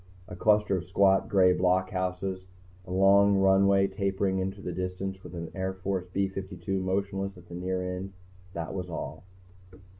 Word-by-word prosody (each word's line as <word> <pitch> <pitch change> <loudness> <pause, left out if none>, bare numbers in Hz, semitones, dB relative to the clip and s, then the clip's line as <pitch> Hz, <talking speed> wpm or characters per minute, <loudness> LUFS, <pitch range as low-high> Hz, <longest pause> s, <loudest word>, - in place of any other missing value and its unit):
A - - -8
cluster 105 0 +3
of 90 - -5
squat, 95 +1 +3
gray 95 -2 +5
blockhouses; 95 0 -1 0.4
a - - -8
long 100 +1 +5
runway 95 0 +4
tapering 95 -1 -1
into 95 +1 -3
the 90 - -5
distance 95 +1 -4
with 90 - -9
an 85 -1 -6
Air 95 0 -2
Force 95 -1 -3
B 100 +1 +1
52 95 0 -4
motionless 95 +1 -2
at 90 -1 -15
the - - -11
near 90 +1 -2
end; 95 +1 -7 0.4
that 85 -1 -4
was 90 -2 -4
all. 80 - -5
95 Hz, 160 wpm, -28 LUFS, 90-95 Hz, 0.4 s, gray